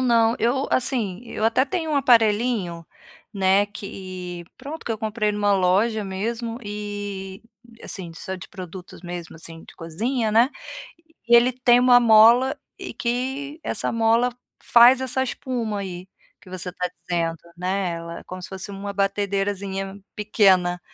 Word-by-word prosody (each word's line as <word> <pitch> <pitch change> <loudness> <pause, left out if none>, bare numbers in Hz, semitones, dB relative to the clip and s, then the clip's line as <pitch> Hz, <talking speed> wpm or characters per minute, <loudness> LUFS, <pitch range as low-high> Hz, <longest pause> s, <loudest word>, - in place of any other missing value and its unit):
não. 230 -2 +3
Eu 250 +4 +1
assim, 230 -7 0
eu 220 - -4
até 230 +4 +3
tenho 320 +2 -3
um 290 - +1
aparelhinho, 220 - +2 0.5
né, 195 +1 +3
que 185 -3 -8
pronto, 310 +3 -8
que 230 - 0
eu - - -3
comprei 215 -1 -1
numa 205 -1 +1
loja 200 +4 +2
mesmo 230 +5 -4
e, 205 -2 -6 0.4
a - - -10
assim, 175 -4 -6
só 190 +3 -6
de 180 - -11
produtos 185 -1 -10
mesmo, 175 -1 -7
assim, 165 0 -11
de - - -15
cozinha, 220 +8 -2
né. 230 +4 +5 0.8
E 240 - +6
ele 240 +2 +5
tem 245 -1 +4
uma 250 -1 +7
mola, 235 +3 +6 0.2
e - - -7
que 265 +5 -3
essa - - -2
mola 230 +2 +3
f 245 - -10 0.4
faz 245 +2 +8
essa 260 0 0
espuma 240 -5 -3
aí, 185 -1 -6 0.3
que - - -17
você 185 -1 -4
está 180 0 -3
dizendo, 165 -2 -1 0.2
né, 185 0 -1
ela 170 0 -7
como 185 0 -8
se - - -7
fosse 190 +1 -7
uma 200 +1 -6
batedeirazinha 195 0 -2 0.2
pequena, 190 -4 +3
205 Hz, 155 wpm, -23 LUFS, 185-235 Hz, 0.8 s, faz